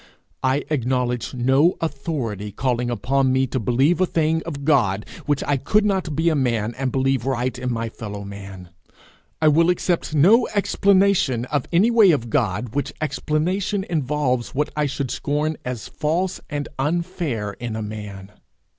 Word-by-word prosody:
I 130 +2 +1
acknowledge 125 -2 -1
no 135 +8 +3
authority 135 - -3
calling 125 +2 -1
upon 130 +3 +1
me 130 +1 +2
to 130 0 -2
believe 135 - +2
a 185 - +3
thing 160 0 +1
of 140 -4 -5
God, 110 -10 +2 0.2
which 145 -2 +1
I 145 - +1
could 210 +11 +2
not 190 -7 0
be 160 +3 +1
a 160 - +1
man 120 -5 0
and 130 -1 -1
believe 135 -2 +1
right 130 -1 -1
in 125 0 -3
my 115 -1 -2
fellow 105 -3 -7
man. 100 -2 -9 0.7
I - - +6
will 165 +3 +4
accept 175 -3 0
no 205 - +5
explanation 195 - +3
of 145 -3 0
any 190 +8 +4
way 225 -4 +6
of 120 -8 +1
God 110 -3 0
which 145 - -2
explanation 180 +6 -1
involves 135 -5 -1
what 150 +2 0
I 150 -1 +1
should 140 -2 -3
scorn 150 +2 -1
as 125 -4 -5
false 175 +5 -1
and 145 -1 -3
unfair 150 - -2
in 120 -2 -4
a 110 - -3
man. 105 -2 -7
135 Hz, 165 wpm, -22 LUFS, 120-160 Hz, 0.7 s, I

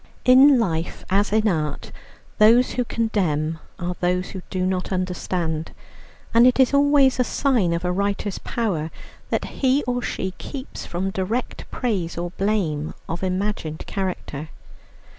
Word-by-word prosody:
In 265 +2 +7
life 170 -6 -2
as 200 +2 +2
in 215 +1 +3
art 155 -6 -2 0.5
those 230 +4 +6
who 250 - 0
condemn 170 -10 -1 0.2
are 180 0 -3
those 180 0 0
who 190 - -6
do 185 -1 -1
not 185 0 -1
understand; 180 -3 -2 0.6
and 235 +2 +7
it 255 - +3
is 260 +1 +4
always 280 -2 +4
a - - +5
sign 245 -9 +1
of 170 +1 -1
a 180 - +1
writer's 200 +1 -1
power, 185 -10 -2 0.4
that - - 0
he 270 +2 +1
or 245 0 -1
she 190 - -3
keeps 270 -1 -7
from 190 +2 -2
direct 205 +7 -3
praise 195 -10 -2
or 175 0 -3
blame 180 -7 -1
of 165 +1 -4
imagined 185 -4 -2
character. 175 -6 -4
190 Hz, 145 wpm, -23 LUFS, 175-235 Hz, 0.6 s, In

